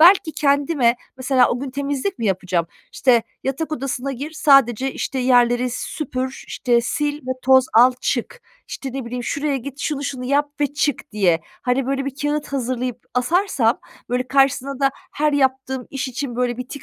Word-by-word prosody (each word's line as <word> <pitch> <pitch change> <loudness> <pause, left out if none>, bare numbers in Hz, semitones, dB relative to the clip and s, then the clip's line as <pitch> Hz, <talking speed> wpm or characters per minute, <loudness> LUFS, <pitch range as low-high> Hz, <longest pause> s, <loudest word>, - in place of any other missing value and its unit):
belki 340 -2 +6
kendime 280 -4 +2 0.2
mesela, 260 -1 +3
o 245 - -1
gün 275 -2 -4
temizlik 280 +6 -2
mi 225 - -1
yapacağım, 180 -3 0 0.3
işte, 240 -3 +3 0.2
"Yatak 310 +4 -2
odasına 275 -1 -3
gir, 280 +5 -5
sadece, 270 -4 +4
işte, 265 - -3
yerleri 245 -1 +3
süpür, 260 0 -4
işte, 240 -2 +1
sil 295 -1 0
ve - - -2
toz 260 0 +6
al, 250 +3 +7
çık." 275 - -2 0.3
İşte, 270 -2 -6
ne 270 -2 -4
bileyim, 245 0 -5
"Şuraya 285 -1 -1
git, 275 +2 -7
şunu 285 -2 -2
şunu 255 -3 -4
yap 285 +2 +1
ve 290 - +4
çık." 290 +1 -2
diye, 180 -6 +2 0.2
hani, 250 +1 0
böyle 275 0 -1
bir 275 -1 -4
kâğıt 295 0 -1
hazırlayıp 250 -2 -2 0.2
asarsam, 250 - +2 0.3
böyle, 250 +1 -1
karşısına 275 0 +2
da 275 0 +4 0.2
her 300 0 +1
yaptığım 265 -2 0
iş 270 -1 -3
için, 250 -1 -4
böyle, 245 -1 0
bir 250 +1 -6
tik 285 - -8
265 Hz, 175 wpm, -21 LUFS, 250-285 Hz, 0.3 s, al